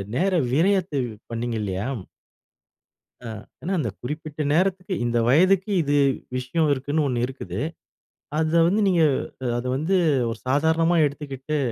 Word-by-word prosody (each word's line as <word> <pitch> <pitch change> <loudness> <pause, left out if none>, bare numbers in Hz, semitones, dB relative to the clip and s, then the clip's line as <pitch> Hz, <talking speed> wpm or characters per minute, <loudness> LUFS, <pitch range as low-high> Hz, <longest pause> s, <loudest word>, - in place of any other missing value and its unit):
நேர 190 +5 +2 0.2
விரயத்தை 180 -1 +2
வ் 110 - -8 0.2
பண்ணீங்கில்லையா 110 -4 -2 1.4
ஆ - - -5 0.3
ஆனா 185 - -3
அந்த 115 - -1
குறிப்பிட்ட 150 +3 -5
நேரத்துக்கு, 185 +2 +1
இந்த 120 0 0
வயதுக்கு 185 - +4
இது 145 -1 +1 0.4
விஷயம் 145 +5 0
இருக்குன்னு 145 +3 -1
ஒண்ணு 120 -2 0
இருக்குது. 105 -7 -6 0.8
அத 160 0 0
வந்து 205 +4 +2
நீங்க 175 -4 +3 0.4
அ - - -3
அத 120 - -4
வந்து 170 +7 +1 0.3
ஒரு 115 - -4
சாதாரணமா 160 +5 +3
எடுத்துக்கிட்டு, 145 0 -4
150 Hz, 130 wpm, -24 LUFS, 125-175 Hz, 1.4 s, வயதுக்கு